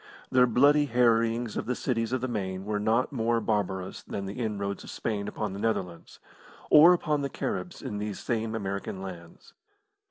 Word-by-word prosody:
Their 125 -1 +5
bloody 145 +5 +4
harryings 115 -2 +2
of - - -3
the 125 - 0
cities 115 -3 -1
of 130 -1 0
the 130 - -1
Main 95 -5 -3
were 105 0 -1
not 110 +4 +1
more 115 -3 +1
barbarous 95 -4 -2
than 100 - -5
the 100 +5 -6
inroads 100 -4 -3
of - - -10
Spain 105 -2 -3
upon 105 -1 -3
the 100 - -6
Netherlands 95 -6 -3 0.5
or 155 +4 +9
upon 155 -4 +1
the 140 - -2
Caribs 180 - -4
in 105 - -4
these 105 -1 -4
same 115 -2 -2
American 100 -2 -4
lands. 85 -3 -10
110 Hz, 180 wpm, -28 LUFS, 100-125 Hz, 0.5 s, or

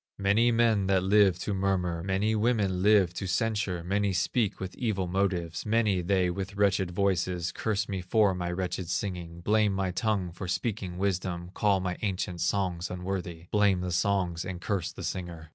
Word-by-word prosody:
Many 105 +5 +3
men 115 -4 +3
that 95 -1 +2
live 95 -2 +4
to 105 - -2
murmur, 95 -3 0
Many 95 +4 0
women 105 -5 +1
live 100 -3 +4
to 95 - -4
censure, 105 -4 -1
Many 100 +2 0
speak 100 +4 0
with 95 -1 -5
evil 105 -7 -1
motives; 90 -3 -1
Many 105 -4 +2
they 90 0 +1
with 95 +2 -5
wretched 100 -2 +2
voices 90 -2 0
Curse 105 +2 -1
me 95 -2 -3
for 100 +2 +3
my 90 -1 -3
wretched 90 -1 -3
singing, 85 -3 -3
Blame 105 +2 +2
my 95 -1 -1
tongue 100 -2 -1
for 90 +2 -7
speaking 95 -2 -2
wisdom, 90 -2 -2
Call 100 -2 +2
my 90 -1 -2
ancient 90 -4 -2
songs 90 -2 0
unworthy, 90 -2 -4
Blame 100 -3 +3
the 90 0 -3
songs 90 -2 0
and 90 -2 -5
curse 95 -2 -2
the - - -9
singer. 85 -4 -5
95 Hz, 175 wpm, -28 LUFS, 90-100 Hz, -, live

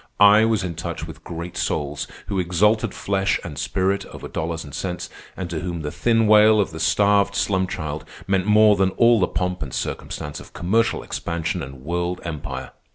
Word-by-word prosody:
I 105 +2 +7
was 110 -3 +1
in 90 -2 -3
touch 80 - -5
with - - -11
great 85 +1 -6
souls 75 0 -2 0.2
who 100 -2 -2
exalted 105 +5 +2
flesh 95 0 0
and 80 -4 -7
spirit 95 +1 0
over - - -9
dollars 80 0 -3
and 70 - -11
cents, 90 +1 -4 0.3
and 95 - -3
to 80 - -2
whom 85 -1 -4
the 75 -1 -4
thin 115 -1 +2
wail 110 0 +6
of 100 - +1
the 80 - -7
starved 100 +2 +3
slum 95 -2 +1
child 75 -3 -4 0.2
meant 95 0 +1
more 105 0 +6
than 95 -1 +2
all 115 -1 +5
the 90 - +3
pomp 90 0 -2
and 70 -4 -4
circumstance 75 0 -4
of - - -14
commercial 110 +6 +1
expansion 85 +1 -3
and 65 -2 -9
world 85 +3 -2
empire. 75 -5 -5
90 Hz, 190 wpm, -22 LUFS, 80-105 Hz, 0.3 s, I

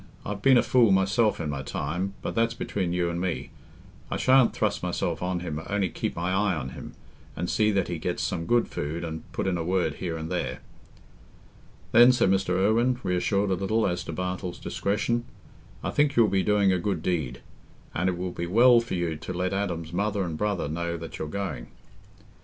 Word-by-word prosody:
I've 100 0 -4
been 130 +1 +6
a - - +4
fool 120 -5 +4
myself 100 +3 +2
in 80 -3 -2
my 70 -1 -3
time, 90 +8 -3
but - - -3
that's 115 0 +1
between 95 -6 -2
you 85 -1 0
and 85 +1 -3
me. 90 -2 -3 0.6
I - - -2
shan't 130 -1 +5
thrust 105 -1 -1
myself 90 -1 -2
on 90 -1 -1
him 80 -3 -4
only 100 -2 +1
keep - - -3
my 85 +2 -1
eye 95 0 +2
on 65 -4 -4
him, 65 - -9 0.4
and 90 - -3
see 110 +3 +2
that 100 -3 +1
he 85 -2 -4
gets - - -2
some 85 0 -2
good 120 -1 +3
food, 80 +4 -4
and 80 -1 -6
put - - -3
in 90 -2 0
a - - -1
word 90 +2 0
here 85 -3 -3
and 80 0 -6
there." - - -2 1.3
"Then," 120 +2 +8
said 125 -6 +3
Mr. 95 -2 +1
Irwine, 115 +6 +3
reassured 100 +2 +1
a - - +4
little 105 +5 +1
as 90 -2 -1
to - - -5
Bartle's 90 -1 -4
discretion, 110 +4 -1 0.6
"I - - -1
think 145 -1 +2
you'll 115 -3 +5
be 95 0 +2
doing 100 -1 +3
a 90 - +1
good 85 -3 -2
deed; 75 -9 -2 0.5
and 90 +3 +1
it 90 - -2
will 90 0 -3
be 85 0 -4
well 120 +6 +6
for 115 -5 -4
you 85 -3 -1
to 90 - -6
let 90 +2 -1
Adam's 85 -5 -3
mother 100 +2 0
and 85 -3 -3
brother 100 -2 -1
know 85 +2 -3
that 80 0 -8
you're 80 - -3
going." 75 -8 -4
95 Hz, 210 wpm, -26 LUFS, 85-105 Hz, 1.3 s, Then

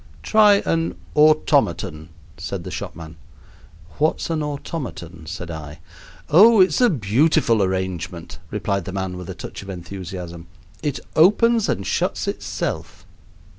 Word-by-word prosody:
"Try 210 -2 +5
an 165 0 0 0.2
'automaton,'" 140 - +2 0.3
said - - -5
the - - -7
shopman. 80 -1 -7 0.8
"What's 155 +2 +1
an 160 -1 0
'automaton'?" 130 - -6
said 85 +2 -6
I. 75 -2 -8 0.5
"Oh, 215 +8 +7
it's 190 +6 +4
a 245 - +6
beautiful 115 - +2
arrangement," 95 -2 -3
replied 100 -3 -2
the 95 - -6
man, 95 -1 -3
with 90 -1 -8
a - - -5
touch - - -8
of 100 - -11
enthusiasm. 90 -2 -7 0.3
"It 145 -2 -2
opens 215 +6 +4
and 100 - -1
shuts - - -1
itself." - - -4
100 Hz, 130 wpm, -22 LUFS, -, 0.8 s, Oh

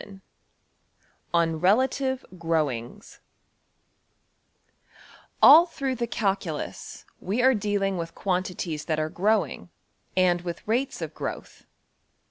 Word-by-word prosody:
png}% 195 -1 -13 1.1
\Chapter{III}{On 165 -2 +1
Relative 260 +6 +1
Growings} 155 - -3 2.2
\First{All} 330 +5 +9
through 270 -4 -3
the 240 -1 -3
calculus 195 -8 -3
we 215 +7 -1
are 260 +1 +6
dealing 200 -3 -1
with 165 0 -6
quantities 180 -4 -3
that 155 -2 -1
are 155 0 -1
growing, 205 +1 0 0.5
and 180 -1 +3
with 175 +1 -7
rates 250 +5 -1
of - - -6
growth. - - -7
195 Hz, 100 wpm, -26 LUFS, 170-230 Hz, 2.2 s, First{All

